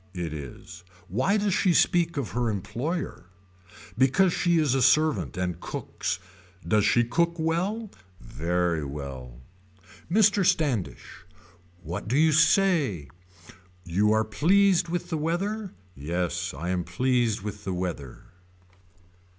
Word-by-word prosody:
It 85 -3 -4
is. 80 +4 -9 0.3
Why 130 - +1
does 205 -2 0
she 180 -2 +2
speak 170 -2 +2
of 135 -5 -3
her 120 -1 0
employer. 120 - -4 0.7
Because 135 - +3
she 175 -1 +2
is 150 -5 +2
a 135 - +1
servant 150 -2 +2
and 90 -2 -2
cooks. - - -4 0.5
Does 105 -1 +3
she 120 +3 +4
cook 170 +8 0
well. 185 +7 -1 0.3
Very 85 +5 -1
well. 70 -4 -7 0.7
Mr. 205 0 +4
Standish. 150 - -1 0.6
What 85 +6 -5
do 125 +5 +1
you 160 +1 +4
say. 155 - +2 0.8
You 100 +5 +2
are 110 0 +2
pleased 180 - +3
with 175 +1 -3
the 160 - -1
weather. 195 +6 -2 0.2
Yes 85 +4 -2
I 80 +6 -5
am 90 -1 -1
pleased 120 +4 0
with 105 0 -6
the 95 - -3
weather. 85 -8 -5
120 Hz, 125 wpm, -26 LUFS, -, 0.8 s, she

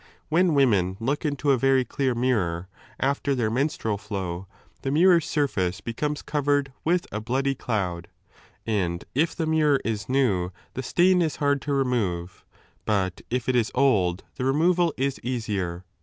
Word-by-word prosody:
When 170 0 +3
women 100 -9 +3
look 140 +7 -1
into 145 -1 -1
g - - +7
I - - +6
a - - +2
very 135 0 +3
clear 130 +1 -1
mirror* 95 -9 0 0.3
after 140 +1 0
their 115 -4 0
menstrual 115 -5 -1
flow, 95 -4 -5 0.3
the 135 - -2
mirror's 170 +3 +4
surface 95 - 0
becomes 145 +8 -3
covered 145 -2 0
with 175 +2 +1
a 105 - -3
bloody 135 +5 0
cloud, 90 -9 -3 0.6
and 90 -6 -1
if 160 +5 +1
the 165 - -1
mirror 155 -3 +3
is 105 -2 -3
new 105 -10 +1 0.2
the 130 - -3
stain 180 +7 +3
is 160 -3 0
hard 145 -1 +1
to 145 - -2
remove, 100 -10 -1 0.4
hut 95 -4 0
if 125 -1 -2
it 130 - +2
is 120 -1 +2
old 100 -10 +2
9 - - -35
' - - -42
the 130 - -2
removal 170 +5 +3
is 135 +1 -1
easier. 100 -8 -3
130 Hz, 170 wpm, -25 LUFS, 100-145 Hz, 0.6 s, g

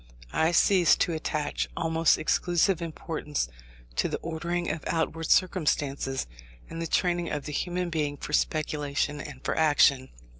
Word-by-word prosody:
I 160 +1 +2
ceased 180 0 +4
to 170 - +2
attach 155 -2 -2
almost 165 0 +3
exclusive 175 +2 +1
importance 155 - -3 0.5
to - - +2
the - - -2
ordering 170 +2 -2
of 155 0 -5
outward 165 -1 -1
circumstances, 145 -7 +1 0.5
and 165 - -5
the 165 - -2
training 175 0 +1
of 150 -1 -3
the 150 - -5
human 180 +3 -2
being 150 -3 -1
for 150 - -7
speculation 145 -2 0
and 140 -3 -10
for - - 0
action. 145 -4 +4
160 Hz, 145 wpm, -27 LUFS, 150-170 Hz, 0.5 s, ceased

